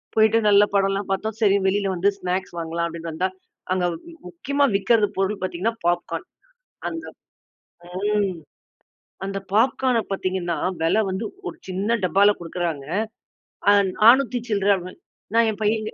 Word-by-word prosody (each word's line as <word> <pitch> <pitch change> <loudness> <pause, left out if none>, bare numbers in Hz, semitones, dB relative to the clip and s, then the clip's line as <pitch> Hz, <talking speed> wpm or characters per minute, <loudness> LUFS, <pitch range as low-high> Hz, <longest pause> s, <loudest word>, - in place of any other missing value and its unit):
போயிட்டு, 220 +1 +5
நல்லா 205 0 +6
படம்லாம் 195 0 +1
பார்த்தோம். 220 +3 -2
சரி 200 -2 +5
வெளியில 200 0 +1
வந்து 190 +4 +3
ஸ்நாக்ஸ் 180 0 -3
வாங்கலாம் 165 +1 -2
அப்டின்ட்டு 165 0 -6
வந்தா, 185 +4 0 0.4
அங்க 180 -1 0 0.4
முக்கியமா 285 -4 0
விக்கிறது 210 0 +3
பொருள் 195 0 -1
பாத்தீங்கன்னா, 185 +5 -1
பாப்கார்ன். 175 0 -1 0.6
அந்த, 330 -1 -6 0.9
ம் 195 -1 -1 0.9
அந்த 195 0 -3
பாப்கார்ன 250 +1 +3
பாத்தீங்கன்னா, 185 -3 -2 0.3
வெல 205 +7 +3
வந்து 190 +4 -3 0.2
ஒரு - - -6
சின்ன 205 +5 0
டப்பால 200 +4 +5
குடுக்குறாங்க. 165 -4 -3 0.8
ஆ - - +8 0.3
நானூத்தி 245 +3 +5
சில்லற. 200 -1 +3 0.6
நான் 230 -1 +5
என் 215 - -9
பையன் 215 +1 +1
கி - - -6
200 Hz, 130 wpm, -23 LUFS, 185-220 Hz, 0.9 s, ஆ